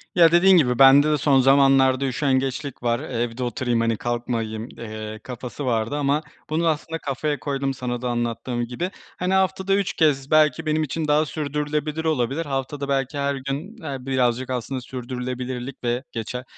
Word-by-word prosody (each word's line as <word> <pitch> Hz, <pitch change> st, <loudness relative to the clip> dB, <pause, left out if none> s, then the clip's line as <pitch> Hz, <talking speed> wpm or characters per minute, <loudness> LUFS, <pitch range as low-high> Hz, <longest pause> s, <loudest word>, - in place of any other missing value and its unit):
Ya, 170 Hz, -2 st, +7 dB
dediğin 185 Hz, +2 st, +6 dB
gibi, 125 Hz, -6 st, +2 dB
bende 140 Hz, +3 st, +7 dB
de 150 Hz, -, +3 dB
son 140 Hz, -1 st, +3 dB
zamanlarda 135 Hz, 0 st, +4 dB
üşengeçlik 135 Hz, 0 st, -1 dB
var, 120 Hz, 0 st, +1 dB
evde 120 Hz, 0 st, -3 dB
oturayım, 120 Hz, 0 st, -1 dB
hani 115 Hz, -1 st, +1 dB
kalkmayayım, 115 Hz, -2 st, -3 dB
eee, 110 Hz, -1 st, -7 dB
kafası 125 Hz, +3 st, -6 dB
vardı 115 Hz, +2 st, 0 dB
ama 145 Hz, +1 st, +1 dB, 0.3 s
bunu 165 Hz, +2 st, +1 dB
aslında 160 Hz, +1 st, -1 dB
kafaya 145 Hz, +1 st, -2 dB
koydum 135 Hz, -1 st, -2 dB
sana 120 Hz, -2 st, -4 dB
da 125 Hz, -, -2 dB
anlattığım 120 Hz, 0 st, -2 dB
gibi. 125 Hz, +10 st, -4 dB, 0.3 s
Hani, 180 Hz, +1 st, -1 dB
haftada 190 Hz, 0 st, +2 dB
3 200 Hz, -2 st, 0 dB
kez 145 Hz, -3 st, +1 dB
belki 155 Hz, 0 st, +4 dB
benim 155 Hz, 0 st, +1 dB
için 155 Hz, +2 st, -3 dB
daha 150 Hz, +1 st, +3 dB
sürdürülebilir 150 Hz, +1 st, -3 dB
olabilir. 150 Hz, +1 st, 0 dB
Haftada 140 Hz, +1 st, -3 dB
belki 135 Hz, +1 st, -1 dB
her 140 Hz, 0 st, 0 dB
gün, 140 Hz, -, -5 dB
eee, 140 Hz, -3 st, -4 dB
birazcık 130 Hz, -1 st, 0 dB
aslında 130 Hz, +1 st, -3 dB
sürdürülebilirlik 125 Hz, +1 st, -5 dB
ve 120 Hz, +2 st, -1 dB
geçe 120 Hz, +2 st, -5 dB
135 Hz, 165 wpm, -23 LUFS, 125-150 Hz, 0.3 s, Ya